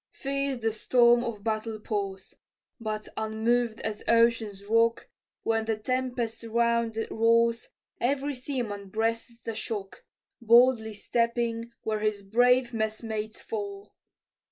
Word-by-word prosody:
Fierce 275 -1 -2
the 225 -1 0
storm 240 +2 +4
of 220 -4 -5
battle 220 0 -2
pours: 200 -3 -4 0.5
But 215 -2 -4
unmoved 220 +1 0
as 215 -1 -4
ocean's 230 -4 +2
rock, 230 +2 +2 0.4
When 225 -1 +1
the 220 -1 0
tempest 250 0 -2
round 235 0 +1
it 225 - -3
roars, 230 +1 +2 0.3
Every 280 +3 0
seaman 240 -7 -4
breasts 230 +2 -2
the 225 - -3
shock, 215 -3 -5 0.4
Boldly 235 -1 +5
stepping 235 +1 -1
where 215 -1 -1
his 210 -1 -1
brave 245 +4 +3
messmates 220 0 -3
fall. 405 -2 -6
230 Hz, 120 wpm, -28 LUFS, 220-240 Hz, 0.5 s, Boldly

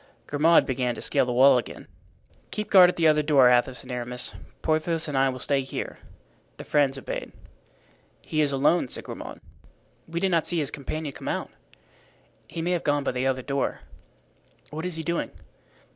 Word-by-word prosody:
Grimaud 160 +3 +4
began 125 -2 -1
to - - -8
scale - - +2
the - - -1
wall 130 +1 +6
again. - - -9 0.6
"Keep 210 - -5
guard 185 -3 +8
at - - -3
the 165 -1 +3
other 150 -1 +4
door, 140 -4 +5
Athos 125 +1 +1
and - - -10
Aramis. 125 0 -4 0.3
Porthos 160 +1 0
and 145 - -4
I 135 0 +3
will 130 - -4
stay 135 +2 0
here." 135 - -6 0.6
The - - -8
friends 140 -2 +1
obeyed. 135 - -5 0.9
"He 155 - -1
is 145 -2 +2
alone," 140 +3 +2
said - - -6
Grimaud. - - -8 0.7
"We 165 +1 -3
did 190 +1 +1
not 165 -2 +1
see 175 - 0
his 145 -3 0
companion 145 +1 -5
come - - -9
out." - - -3 1.0
"He 165 - -5
may 175 - 0
have 175 -2 0
gone 145 -1 +1
by - - 0
the 125 +1 -1
other 130 -1 -1
door." 140 0 -2 0.9
"What 160 +4 -4
is 180 - -4
he 160 - -4
doing?" 170 +1 -2
145 Hz, 190 wpm, -26 LUFS, 130-165 Hz, 1.0 s, guard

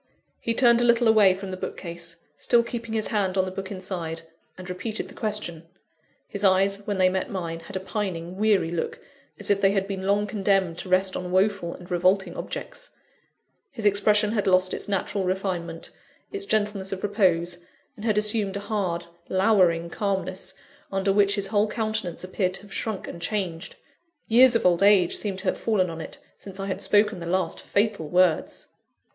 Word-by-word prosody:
He 230 - -2
turned 240 -1 +5
a - - +3
little 235 0 +4
away 210 -4 +6
from 190 0 -7
the 185 - -5
bookcase 170 -2 -5 0.2
still 240 -1 +3
keeping 230 -1 -5
his 215 - 0
hand 195 -3 0
on 190 - +3
the 185 - -5
book 190 0 -6
inside 180 -4 -4 0.3
and 185 -1 -9
repeated 200 +4 -3
the - - -11
question. 190 -7 -4 0.6
His 200 - -5
eyes, 195 +1 +4
when 205 -2 -1
they 185 -1 +5
met 185 0 -1
mine, 170 -4 -4
had 180 +4 -9
a - - 0
pining, 185 -3 -4
weary 200 -4 +2
look, 170 -2 -3 0.4
as 205 -1 -2
if 200 0 +2
they 195 0 +4
had 195 -1 0
been 190 -1 -4
long 205 +1 +2
condemned 195 -4 0
to 185 - -7
rest 185 +1 +2
on 180 -1 -4
woeful 190 -2 +1
and 180 0 -13
revolting 185 +2 +2
objects; - - -7 0.8
his 225 -4 -6
expression 210 +1 +3
had 210 -3 0
lost 185 0 +3
its - - -4
natural 200 0 -1
refinement, 180 -3 -3 0.4
its 400 -1 -4
gentleness 205 -2 0
of 190 -1 -5
repose, 180 -4 +1 0.4
and 210 - -11
had 215 -2 +1
assumed 210 -2 +1
a - - -5
hard, 195 -5 -2 0.2
lowering 185 -4 +3
calmness, 190 0 -3 0.4
under 195 0 +1
which 200 0 +4
his 200 -2 -1
whole 210 0 +2
countenance 215 -6 -3
appeared 185 0 -1
to 195 - -7
have 205 - -12
shrunk 215 -4 -3
and 170 - -8
changed 180 -2 -3 0.5
years 245 +2 +6
of 230 - +1
old 175 0 +4
age 200 -3 +5
seemed 200 -3 -3
to 190 - -8
have 185 - 0
fallen 190 -6 +1
on 165 0 -6
it, - - -9 0.2
since 195 -1 -9
I 195 - -3
had 190 - -3
spoken 210 -2 +2
the 170 - -6
last 180 -1 -1
fatal 200 -7 0
words! 180 -2 +2
195 Hz, 190 wpm, -25 LUFS, 185-210 Hz, 0.8 s, away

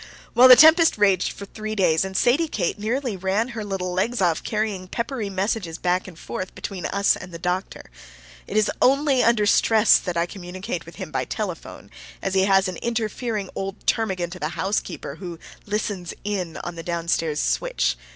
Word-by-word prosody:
Well, 250 +2 +8
the 255 - +11
tempest 320 +2 +6
raged 195 -3 +3
for 200 - -9
three 215 +2 -6
days, 165 -5 +3
and 190 0 -3
Sadie 285 +7 +3
Kate 200 - -2
nearly 235 +2 -2
ran 190 +6 -1
her 225 -3 -5
little 190 -3 -3
legs 230 +7 0
off 175 -4 +2
carrying 210 -4 -2
peppery 235 0 -3
messages 190 -3 -2
back 180 +1 0
and 175 -3 -11
forth 185 +2 -6
between 190 -3 -5
us 200 0 +2
and 180 - -10
the 170 - -7
doctor. 180 +2 -3 0.6
It 210 - -2
is 215 -1 +3
only 275 0 +4
under 230 -3 +3
stress 220 +1 +5
that 180 -2 -4
I 170 - +2
communicate 185 +5 -6
with - - -11
him - - -7
by - - -1
telephone, - - -6 0.3
as 195 - -3
he 190 0 +3
has 195 -1 +4
an 185 -2 -5
interfering 225 -3 -3
old 195 +1 -6
termagant 185 -5 0
of 180 - -11
a 155 - -1
housekeeper 195 +5 -3
who 175 -3 -7 0.3
"listens 205 -4 -3
in" 190 -5 -3
on 175 - -5
the 165 - -7
down 170 0 -4
stairs 160 -3 0
switch. - - 0
195 Hz, 190 wpm, -23 LUFS, 180-220 Hz, 0.6 s, the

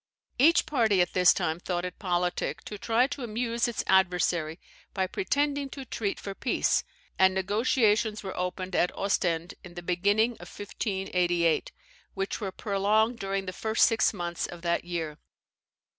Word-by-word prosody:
Each 320 +6 +5
party 230 -10 +2
at 175 -1 +2
this 180 -1 +6
time 160 +1 -1
thought 175 -1 -2
it 180 - -7
politic 180 -2 -1
to 210 - -7
try 230 +4 +2
to 280 +1 -5
amuse 235 0 -1
its 240 - -2
adversary 175 -4 +2 0.4
by 190 -1 +1
pretending 280 +9 -1
to 270 -1 -8
treat 210 -4 -3
for 200 - -6
peace, 245 - +1 0.4
and 190 0 +5
negotiations 210 +2 +1
were 190 - -5
opened 180 0 -3
at 180 - +2
Ostend 175 -3 0
in 180 -1 -12
the 175 - -7
beginning 200 +6 +2
of - - -10
1588, 180 -5 -1 0.4
which 195 +3 -3
were 195 -2 -3
prolonged 215 +4 +1
during 195 0 -2
the 185 - -5
first 220 +4 +3
six 225 -1 +3
months 175 -4 -3
of 175 -1 -10
that 170 0 0
year. 165 -4 -4
195 Hz, 160 wpm, -28 LUFS, 180-220 Hz, 0.4 s, this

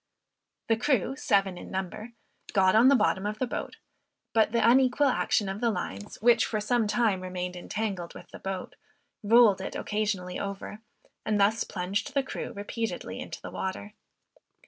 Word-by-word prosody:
The 225 - +3
crew, 265 -1 +1
seven 195 -8 +1
in - - -10
number, 190 +5 -5 0.4
got 190 -2 +4
on 230 +4 +6
the 275 - +7
bottom 205 -3 +1
of 210 +1 -3
the 255 - 0
boat; 245 - -5 0.6
but 220 -1 +3
the 235 0 +3
unequal 260 +3 +4
action 220 -4 +1
of 195 +2 -4
the 235 - +3
lines, 100 - -5
which 235 -1 +5
for 215 - -1
sometime 215 -2 +1
remained 180 -1 -4
entangled 190 -1 -4
with - - -12
the - - -10
boat, 190 -1 -5 0.5
rolled 215 -2 +5
it - - -5
occasionally 205 -4 -2
over, 200 +1 -5 0.4
and 215 -1 0
thus 215 +3 +3
plunged 195 +8 -3
the 275 - +3
crew 265 - -5
repeatedly 225 +1 -4
into - - -7
the - - -7
water. 195 +2 -5
210 Hz, 165 wpm, -28 LUFS, 190-235 Hz, 0.6 s, the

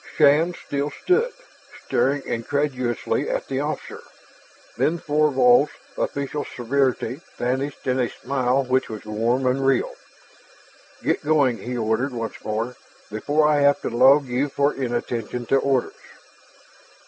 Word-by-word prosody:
Shann 155 +4 +4
still 145 -1 -3
stood, 450 - +1 0.5
staring 140 +1 +1
incredulously 125 -1 -1
at - - -2
the 135 -1 -2
officer. 150 +2 -4 0.7
Then 165 +3 +1
Thorvald's 145 -3 +3 0.2
official 140 +1 -2
severity 130 +1 -1 0.2
vanished 130 +3 -2
in 130 0 +1
a 120 -2 +1
smile 130 0 0
which 130 +1 0
was 110 -1 -7
warm 115 +5 0
and 130 +2 +1
real. 135 -2 +2 1.1
"Get - - 0
going," 145 -5 +2
he 125 0 -4
ordered 115 +4 0
once 115 -3 -5
more, 115 +3 -3 0.3
"before 145 +8 +1
I 150 -1 +3
have 145 0 +4
to - - -3
log 135 +4 +5
you 130 +3 -1
for 140 +2 +1
inattention 120 -1 -3
to 135 - +3
orders." 135 -2 +1
135 Hz, 130 wpm, -23 LUFS, 120-145 Hz, 1.1 s, log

